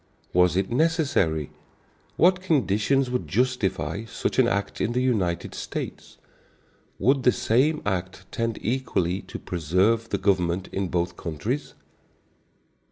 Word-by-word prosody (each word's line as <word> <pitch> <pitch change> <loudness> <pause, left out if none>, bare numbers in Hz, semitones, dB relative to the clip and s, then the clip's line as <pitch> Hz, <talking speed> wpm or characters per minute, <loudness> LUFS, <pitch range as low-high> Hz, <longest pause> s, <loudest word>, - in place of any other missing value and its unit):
Was 90 0 +4
it 95 +2 0
necessary? 125 - +1 0.7
What 185 +1 +4
conditions 135 - +1
would 125 - -2
justify 110 -3 0
such 115 - -2
an 125 - +5
act 100 -3 -2
in 120 - 0
the 125 - +1
United 95 -9 0
States? - - -6 0.8
Would 135 +2 +3
the 125 - +5
same 135 +8 +1
act 95 -2 -3
tend 115 -1 -2
equally 100 -7 0
to - - -8
preserve 95 +7 +1
the - - 0
government 90 -2 0
in 95 -1 -1
both 90 0 -1
countries? 105 - -4
110 Hz, 125 wpm, -25 LUFS, 90-130 Hz, 0.8 s, an